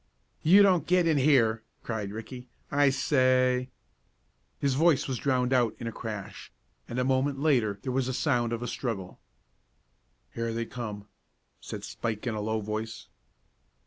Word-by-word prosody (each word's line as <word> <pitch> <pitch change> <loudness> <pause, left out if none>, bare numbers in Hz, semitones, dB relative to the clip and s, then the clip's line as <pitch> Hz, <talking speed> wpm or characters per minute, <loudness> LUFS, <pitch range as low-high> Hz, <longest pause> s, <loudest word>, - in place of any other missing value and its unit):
"You 190 +6 +7
don't 180 -6 +3
get 180 0 +3
in 160 -3 +3
here!" 120 -6 +3 0.2
cried 110 -4 -3
Ricky. 125 +4 -8 0.2
"I 145 0 +4
say 130 -2 +2 0.5
" 65 +1 -44
His 140 -2 +1
voice 150 0 +3
was 130 -3 -3
drowned 130 -2 +1
out 120 -3 +2
in 120 - -7
a 115 - -2
crash, 110 -4 -7 0.4
and 120 - -4
a 125 - +2
moment 135 +2 +1
later 125 -9 +2
there 130 - -2
was 130 0 0
the 130 - -2
sound 120 -4 +1
of 115 0 -3
a - - -3
struggle. 105 -10 -4 1.1
"Here 115 0 -2
they 115 0 -2
come," 105 -4 -7 0.5
said - - -7
Spike 110 -1 -4
in 120 - -1
a 105 - -3
low 110 +1 -1
voice. 110 +2 -5
125 Hz, 165 wpm, -28 LUFS, 110-135 Hz, 1.1 s, You